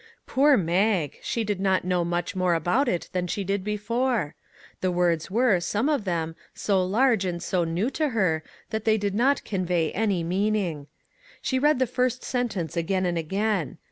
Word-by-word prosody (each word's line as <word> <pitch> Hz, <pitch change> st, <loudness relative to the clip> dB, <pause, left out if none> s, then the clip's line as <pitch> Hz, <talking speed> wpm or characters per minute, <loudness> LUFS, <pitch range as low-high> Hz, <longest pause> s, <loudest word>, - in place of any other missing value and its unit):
Poor 280 Hz, +1 st, +4 dB
Mag! 180 Hz, -2 st, +1 dB
she 230 Hz, -, -2 dB
did 205 Hz, -3 st, -2 dB
not 190 Hz, -2 st, +1 dB
know 180 Hz, -1 st, +1 dB
much 175 Hz, +1 st, -2 dB
more 180 Hz, -2 st, +2 dB
about 175 Hz, -, +1 dB
it 175 Hz, -, -1 dB
than 180 Hz, -1 st, -1 dB
she 195 Hz, +3 st, -3 dB
had 195 Hz, -1 st, -1 dB
before. 210 Hz, -, -1 dB, 0.5 s
The 185 Hz, -, 0 dB
words 175 Hz, -2 st, +1 dB
were, 220 Hz, -2 st, +3 dB
some 210 Hz, -, 0 dB
of 280 Hz, -9 st, 0 dB
them, 165 Hz, -3 st, -2 dB, 0.2 s
so 195 Hz, -3 st, +1 dB
large 220 Hz, +3 st, +2 dB
and 175 Hz, -2 st, -2 dB
so 180 Hz, 0 st, 0 dB
new 175 Hz, +10 st, -1 dB
to 305 Hz, +2 st, 0 dB
her 185 Hz, -10 st, +1 dB, 0.3 s
that 220 Hz, -1 st, -2 dB
they 220 Hz, -1 st, +3 dB
did 200 Hz, -2 st, -1 dB
not 260 Hz, +7 st, +2 dB
convey 180 Hz, -5 st, 0 dB
any 200 Hz, -5 st, 0 dB
meaning. 185 Hz, -4 st, -1 dB, 0.5 s
She 260 Hz, -, 0 dB
read 295 Hz, +1 st, +3 dB
the 260 Hz, -, +2 dB
first 250 Hz, +1 st, -1 dB
sentence 225 Hz, -11 st, -2 dB
again 185 Hz, +3 st, 0 dB
and 175 Hz, -1 st, 0 dB
again. 190 Hz, -, -1 dB
195 Hz, 180 wpm, -25 LUFS, 175-225 Hz, 0.5 s, Poor